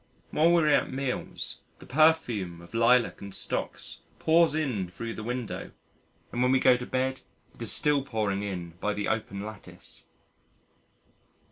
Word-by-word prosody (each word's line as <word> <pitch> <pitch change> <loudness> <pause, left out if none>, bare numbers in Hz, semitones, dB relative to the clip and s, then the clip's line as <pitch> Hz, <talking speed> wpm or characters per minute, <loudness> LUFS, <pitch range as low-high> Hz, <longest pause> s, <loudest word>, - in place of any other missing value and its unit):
While 165 +3 +4
we 170 -2 +5
are - - +2
at 150 - +3
meals 135 -1 -3 0.2
the - - -14
perfume 125 - +2
of 85 +4 -14
Lilac 115 +1 +3
and 100 -1 -7
Stocks - - -3 0.2
pours 165 -1 +4
in 125 - -1
thro' 115 +5 -5
the - - -7
window 120 0 -4 0.6
and 120 - -2
when 125 0 +4
we 130 - +4
go 130 -1 +6
to 125 0 -5
bed 130 +1 -1 0.3
it - - -17
is - - +1
still 150 -1 +3
pouring 105 -6 -1
in 90 -4 -4
by 105 +1 -1
the 105 - -2
open 105 -2 -2
lattice. 110 -2 -10
125 Hz, 160 wpm, -28 LUFS, 105-140 Hz, 0.6 s, go